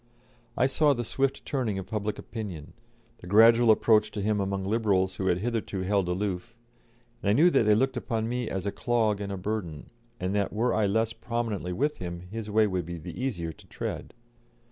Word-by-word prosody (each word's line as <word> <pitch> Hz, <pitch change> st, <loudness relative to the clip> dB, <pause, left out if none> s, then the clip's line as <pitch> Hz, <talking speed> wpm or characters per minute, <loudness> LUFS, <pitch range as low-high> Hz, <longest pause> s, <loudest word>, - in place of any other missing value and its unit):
I 125 Hz, -, +4 dB
saw 145 Hz, +2 st, +3 dB
the 120 Hz, -, -2 dB
swift 135 Hz, +4 st, -1 dB
turning 120 Hz, -8 st, -1 dB
of 95 Hz, -, -4 dB
public 105 Hz, -1 st, -3 dB
opinion, 100 Hz, -10 st, -7 dB, 0.5 s
the 90 Hz, -, -11 dB
gradual 115 Hz, +4 st, +6 dB
approach 110 Hz, -1 st, +4 dB
to 105 Hz, -, -3 dB
him 105 Hz, 0 st, +1 dB
among 100 Hz, 0 st, -1 dB
Liberals 95 Hz, -3 st, +1 dB
who 95 Hz, -, -1 dB
had 90 Hz, -2 st, +3 dB
hitherto 110 Hz, -2 st, -2 dB
held 95 Hz, 0 st, +1 dB
aloof, 95 Hz, +3 st, -3 dB, 0.7 s
and 100 Hz, -, 0 dB
I -, -, +5 dB
knew 165 Hz, +9 st, +5 dB
that 110 Hz, -, +3 dB
they 105 Hz, -, +6 dB
looked 130 Hz, +4 st, +1 dB
upon 115 Hz, -3 st, -2 dB
me 125 Hz, -1 st, -2 dB
as 95 Hz, 0 st, -3 dB
a 100 Hz, -, 0 dB
clog 110 Hz, -4 st, 0 dB
and 100 Hz, -1 st, -4 dB
a 100 Hz, -, -3 dB
burden, 90 Hz, -6 st, -4 dB, 0.3 s
and 90 Hz, +1 st, -2 dB
that 100 Hz, -1 st, 0 dB
were 115 Hz, +4 st, +1 dB
I 110 Hz, -2 st, +2 dB
less 110 Hz, +3 st, +1 dB
prominently 115 Hz, -5 st, -3 dB
with 145 Hz, +10 st, 0 dB
him 85 Hz, -1 st, -6 dB
his 105 Hz, +4 st, -7 dB
way 110 Hz, +1 st, +4 dB
would 95 Hz, -4 st, -2 dB
be 85 Hz, 0 st, -5 dB
the 80 Hz, -, -8 dB
easier 90 Hz, -11 st, -2 dB
to -, -, -17 dB
tread. -, -, -5 dB
105 Hz, 205 wpm, -28 LUFS, 95-115 Hz, 0.7 s, gradual